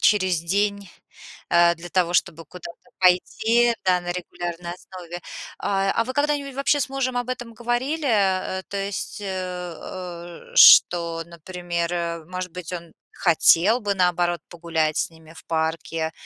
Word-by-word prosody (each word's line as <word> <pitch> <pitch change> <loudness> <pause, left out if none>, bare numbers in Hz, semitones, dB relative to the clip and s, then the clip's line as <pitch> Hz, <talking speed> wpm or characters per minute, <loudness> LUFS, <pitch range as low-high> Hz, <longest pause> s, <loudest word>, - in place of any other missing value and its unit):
через 185 -5 +3
день, 200 +3 -1 0.6
э, 170 0 +5
для 175 +1 -11
того, 175 -2 +1
чтобы 165 -1 0
куда-то 170 +5 -12
пойти, 220 +6 +3
да, 180 -1 +3
на 175 0 -5
регулярной 175 -1 -5
основе. 175 -1 -9 0.4
А, 195 -1 0
а 230 - +1
вы 255 - -5
когда-нибудь, 285 -1 0
вообще, 280 +1 +1
с - - -1
мужем 265 -2 -2
об 245 0 -3
этом 240 -2 -5
говорили, 255 +6 -1
э, 190 -3 +1
то 200 - -4
есть, 200 +1 -4
э, 205 - -6
э, 180 -1 -7
что, 170 -1 +7
например, 170 -1 -4
может 185 +1 -5
быть, 180 -1 -7
он 170 -2 -7 0.2
хотел 180 +6 +4
бы, 205 -2 -1
наоборот, 175 -2 +1
погулять 165 -3 -1
с - - 0
ними 160 0 -17
в - - -14
парке, 160 0 -2
180 Hz, 150 wpm, -23 LUFS, 170-205 Hz, 0.6 s, что